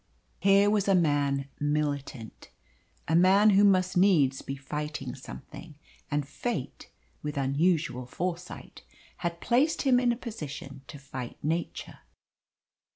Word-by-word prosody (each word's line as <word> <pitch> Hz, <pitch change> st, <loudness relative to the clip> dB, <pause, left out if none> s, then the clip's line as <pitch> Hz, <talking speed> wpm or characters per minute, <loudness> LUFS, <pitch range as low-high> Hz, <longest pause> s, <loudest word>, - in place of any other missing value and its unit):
Here 200 Hz, +1 st, +5 dB
was 205 Hz, -1 st, +2 dB
a 195 Hz, -, +4 dB
man 145 Hz, -5 st, +1 dB
militant. 145 Hz, -5 st, -3 dB, 0.6 s
A 160 Hz, -, +2 dB
man 195 Hz, +5 st, +6 dB
who 200 Hz, +1 st, +5 dB
must 185 Hz, -2 st, +3 dB
needs 165 Hz, -8 st, +3 dB
be 135 Hz, -, -5 dB
fighting 140 Hz, -1 st, -5 dB
something, 150 Hz, +4 st, -11 dB, 0.3 s
and 145 Hz, -1 st, -1 dB
Fate, 155 Hz, -, -5 dB, 0.3 s
with 150 Hz, -1 st, -5 dB
unusual 140 Hz, -1 st, 0 dB
foresight, 175 Hz, +5 st, -5 dB, 0.4 s
had 170 Hz, -1 st, -3 dB
placed 265 Hz, +7 st, +2 dB
him 260 Hz, -3 st, +4 dB
in 245 Hz, -1 st, +2 dB
a 235 Hz, -, -2 dB
position 150 Hz, -, -7 dB
to 130 Hz, -, -9 dB
fight 130 Hz, -3 st, -7 dB
Nature. 165 Hz, +3 st, -3 dB
155 Hz, 125 wpm, -28 LUFS, 140-195 Hz, 0.6 s, man